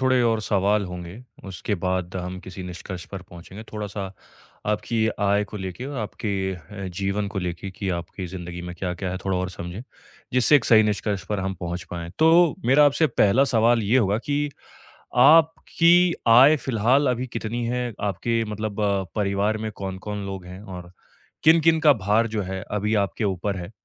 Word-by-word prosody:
थोड़े 130 -1 +3
और 115 -2 +2
सवाल 100 0 +1
होंगे, 90 0 -8 0.3
उसके 95 +2 -3
बाद 90 -1 -2
हम 90 0 -5
किसी 95 0 -9
निष्कर्ष 90 +1 -7
पर 95 -2 -8
पहुँचेंगे, 90 +5 -11
थोड़ा-सा 105 -2 -4 0.6
आपकी 110 +1 0
आय 100 0 +2
को 105 +1 -9
लेके 95 +6 -6
और 140 -1 -6
आपके 110 0 -5 0.3
अ, 95 +3 -9
जीवन 100 +1 -1
को 100 - -4
लेके 90 +1 -4
कि 95 +1 -5
आपके 85 +2 -6
ज़िंदगी 90 -1 -7
में 90 0 -7
क्या-क्या 90 0 -3
है 90 - -3
थोड़ा 95 -1 0
और 90 0 -2
समझें, 90 +4 -7 0.5
जिससे 125 +4 +5
एक 125 - 0
सही 110 -2 +6
निष्कर्ष 105 -2 -1
पर 105 -2 -1
हम 95 0 -2
पहुँच 85 0 -4
पाएँ। 85 -1 -5
तो 165 +1 +5
मेरा 140 +4 +6
आपसे 155 +3 +3
पहला 110 +7 +5
सवाल 115 -2 +3
ये 110 +5 +2
होगा 105 -2 +2
कि 145 0 0 0.8
आपकी 165 +3 +5 0.2
आय 130 +7 +8
फिलहाल 130 +2 +1
अभी 125 +1 -2
कितनी 115 0 -4
है, 125 0 -2
आपके 115 +4 -1
मतलब 105 0 -4
अ, 100 -2 +1
परिवार 105 +1 0
में 110 0 -4
कौन-कौन 100 +1 -5
लोग 95 -2 -6
हैं? 90 +2 -10
और 90 -3 -9 0.5
किन-किन 160 0 +5
का 150 -3 +6
भार 105 +3 +3
जो 110 -2 -2
है, 95 +1 -5
अभी 105 +1 0
आपके 105 +3 -4
ऊपर 95 +1 -1
है 90 +1 -7
105 Hz, 180 wpm, -24 LUFS, 95-115 Hz, 0.8 s, आय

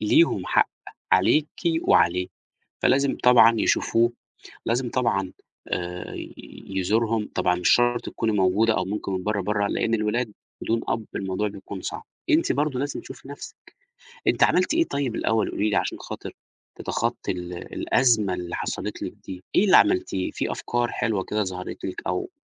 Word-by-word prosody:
ليهم 105 - +3
حق - - +3 0.4
عليكِ 155 0 +4 0.3
وعليه، 90 +2 +3 0.6
فلازم 140 +1 +3
طبعًا 115 -2 +7
يشوفوه، 120 +1 +2 0.5
لازم 120 +1 0
طبعًا 95 -7 0 0.4
آآ 90 0 -4 0.6
يزورهم. 105 +3 0
طبعًا 90 - +2
مش 90 - +1
شرط 120 0 +4
تكوني 110 -1 -1
موجودة 105 +3 +3
أو - - 0
ممكن 100 0 -4
من 95 -1 -2
برّه، 105 -1 0
برّه، 105 +1 0
لإن 115 - 0
الولاد 110 +1 -1 0.3
بدون 115 0 0
أب 115 -1 -1
الموضوع 95 +2 -1
بيكون 100 -1 -8
صعب. - - -5 0.3
أنتِ 315 +2 +3
برضه 145 -3 0
لازم 145 0 -3
تشوفي 135 - -12
نَفْسِك. 145 - -9 0.7
أنتِ - - +4
عملتِ 185 - +3
إيه 335 0 +4
طيب 135 -5 -2
الأول 110 -1 +1
قولي 105 +1 0
لي - - 0
عشان - - -1
خاطر - - -7 0.4
تتخطّي - - -2
ال 90 -1 -5 0.2
الأزمة 110 -7 +2
اللي 90 -1 -4
حصلِت - - -4
لِك - - -5
دي، 90 -1 -8
إيه 205 - +5
اللي 190 - +7
عملتيه؟ 95 -2 +2
في - - -2
أفكار 120 0 -1
حلوة 100 -4 -1
كده 105 0 -1
ظهرِت 90 -1 -6
لِك 95 - -5
أو 380 -1 -2
110 Hz, 160 wpm, -25 LUFS, 95-120 Hz, 0.7 s, طبعًا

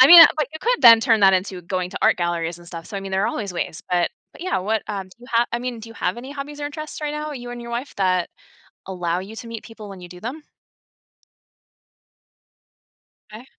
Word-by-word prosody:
I 260 - +10
mean, 340 0 +12
but, 305 -2 +1
you 315 - -6
could - - +1
then 230 -2 +10
turn 225 -3 +3
that 190 -1 +7
into 185 0 -1
going 180 +1 -2
to - - -5
art - - +5
galleries 170 -1 -1
and 175 - -15
stuff, 165 -1 -8
so, 205 - -6
I - - -3
mean, 195 0 -7
there 190 0 +2
are - - +2
always 200 -3 -4
ways, 170 -1 -4
but 175 -1 +2 0.2
but, - - -11
yeah, 370 - 0
what 210 +3 0
um, 195 -2 -3
do 185 - -20
you 245 - -13
have 235 +1 +4
I 235 - 0
mean, 245 -2 -4
do 225 - -10
you - - -12
have 185 -1 -1
any 260 +4 -8
hobbies 290 +1 -7
or 290 - -2
interests 305 +1 -7
right 300 -1 -2
now, 300 0 -4
you 245 -3 -7
and 245 0 -7
your 235 - -8
wife, 245 +4 -4
that 185 -3 +1 0.6
allow 175 -2 -1
you 200 +4 -8
to 235 - -7
meet 230 -1 -7
people 225 -2 -11
when 195 -2 -10
you 175 - -10
do 180 - -11
them? 260 +8 -5 2.9
'Kay. 215 +3 -10
220 Hz, 245 wpm, -22 LUFS, 185-255 Hz, 2.9 s, mean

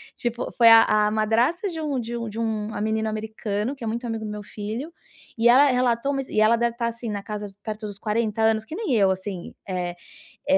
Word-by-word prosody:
tipo, 240 0 -3
foi 235 -2 +6
a 225 0 +9
a 210 0 +2
madrasta 235 - +1
de 330 -3 -6
um 285 -4 -1
de 235 +1 -4
um 230 -1 -4
de 220 +2 -6
um 220 -1 -2
a - - -4
menino 220 0 0
americano 215 +2 -3
que 255 - -11
é - - -2
muito 235 +3 -3
amigo 225 -1 -3
do 210 - -4
meu 210 0 -6
filho, 220 +10 -6 0.5
e 230 - +4
ela 275 +4 +7
relatou, 250 +1 +1
mas 270 -1 -3
e 215 - 0
ela 220 +2 +5
deve 235 0 0
tá 235 -1 -1
assim 235 0 -5
na 205 -1 -3
casa 210 -1 -5 0.2
perto 215 -1 -5
dos 200 -1 -9
40 220 0 -1
anos 220 0 +2
que 310 - -7
nem 400 - -1
eu 195 -3 +4
assim, 190 -1 -5
eh 180 -2 -2 0.6
eh 285 0 +5
225 Hz, 240 wpm, -24 LUFS, 210-240 Hz, 0.6 s, a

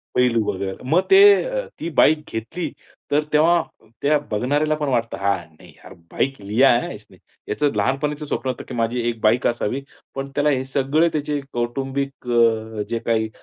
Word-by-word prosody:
पैलू 120 -3 +3
वगैरे. 95 0 -4
मग 175 +5 +4
ते 385 - +8 0.2
अ, - - -3
ती 165 - -3
बाईक 155 0 +5
घेतली 115 +10 -4 0.4
तर 150 +1 +3
तेव्हा 165 +3 +4 0.4
त्या 150 +1 +3
बघणाऱ्याला 145 +8 +1
पण 150 -1 -2
वाटतं, 120 -3 -1
"हां, 100 0 +1 0.2
नाही - - -15
यार - - -14 0.2
बाइक 135 0 -1
लिया 110 +7 +3
है 120 - +3
हां - - -5
इसने." - - -16 0.3
याचं 145 +6 +1
लहानपणीचं 145 +3 -1
स्वप्न 135 -2 -3
होतं, 125 - -4
की - - -8
माझी 115 +1 -1
1 115 -1 -5
बाईक 115 +3 +3
असावी, 120 +2 -1 0.3
पण 135 0 -4
त्याला 145 +1 +2
हे 130 -3 +1
सगळे 140 +5 +1
त्याचे 150 -1 -1
कौटुंबिक 135 +2 -3
अ, 110 -2 +2
जे 115 - -1
काही 110 -1 +1
135 Hz, 180 wpm, -21 LUFS, 115-150 Hz, 0.4 s, ते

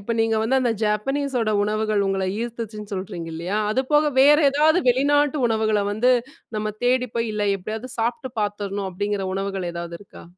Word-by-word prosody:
இப்ப 200 +4 -3
நீங்க 225 0 +2
வந்து 260 +4 +2
அந்த 245 -2 +1
Japaneseஸோட 245 +2 0
உணவுகள் 215 0 0
உங்கள 195 0 0 0.2
ஈர்த்துச்சுன்னு 220 -3 -6
சொல்றீங்க 180 -3 -5
இல்லயா? 180 +6 -2
அதுபோக 295 +5 +2
வேற 290 +2 +7
ஏதாவது 310 +5 +4
வெளிநாட்டு 290 +3 +3
உணவுகள்ல 220 -2 +1
வந்து, 245 +5 +3 0.4
நம்ம 215 0 -2
தேடிப்போய் 245 -2 +1
இல்ல 210 -1 -1
எப்டியாவது 220 +6 -6
சாப்ட்டு 250 +4 -2
பாத்துடணும் 205 -1 -2
அப்டிங்கிற 205 +1 -2
உணவுகள் 195 -2 -3
ஏதாவது 170 0 -6
இருக்கா? 200 - -14
220 Hz, 150 wpm, -23 LUFS, 205-255 Hz, 0.4 s, வேற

